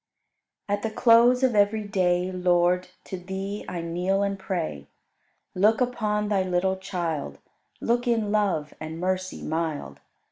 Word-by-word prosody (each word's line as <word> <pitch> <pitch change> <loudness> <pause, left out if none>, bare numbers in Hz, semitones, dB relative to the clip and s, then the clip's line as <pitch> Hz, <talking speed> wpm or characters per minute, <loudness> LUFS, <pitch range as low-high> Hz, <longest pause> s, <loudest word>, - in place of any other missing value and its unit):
31. 205 - +2
At 205 - -9
the 220 0 -4
close 240 +2 +6
of 255 -2 +3
every 210 +1 +3
day, 185 -3 +1
Lord, 180 0 +2 0.2
to 190 - -6
Thee 190 +3 -5
I 175 - -4
kneel 180 +4 0
and 200 -1 -2
pray. 165 - -3 0.7
Look 210 +4 +3
upon 215 -4 0
Thy 205 -2 +2
little 185 +1 0
child, 165 - -3 0.4
Look 240 +1 0
in 225 -3 +1
love 195 -8 0
and 155 +1 -6
mercy 185 +1 -2
mild. 160 -1 -3
190 Hz, 145 wpm, -26 LUFS, 175-210 Hz, 0.7 s, close